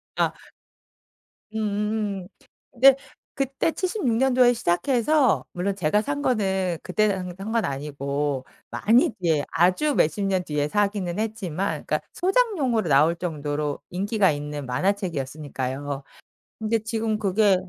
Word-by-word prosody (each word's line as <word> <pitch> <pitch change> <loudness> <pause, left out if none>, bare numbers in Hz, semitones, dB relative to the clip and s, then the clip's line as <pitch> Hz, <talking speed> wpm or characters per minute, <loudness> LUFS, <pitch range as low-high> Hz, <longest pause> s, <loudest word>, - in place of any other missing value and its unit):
아. - - +2 1.2
음음음. 210 -2 -2 0.4
근데 265 +2 +7 0.4
그때 275 +4 0
76 360 - -1
년도에 250 -1 +4
시작해서 240 - +2
물론 190 +3 -1
제가 195 +3 +2
산 285 0 -2
거는 190 - 0
그때 215 +3 +1
산 180 -2 -3
산 200 +4 -6
건 230 -4 +1
아니고 140 -1 -2 0.2
많이 230 +4 +3
뒤에 160 -5 +1
아주 185 - +2
몇십 180 +6 +2
년 190 -2 +1
뒤에 150 -2 -1
사기는 200 -1 0
했지만 200 -4 -2
그러니까 - - 0
소장용으로 350 - +1
나올 150 +5 +5
정도로 150 -3 -3
인기가 195 0 +2
있는 145 -1 -5
만화책이었으니까요. 145 - -2 0.6
근데 220 +1 +1
지금 220 0 -1
그게 205 -1 +3
195 Hz, 275 characters per minute, -24 LUFS, 155-225 Hz, 1.2 s, 근데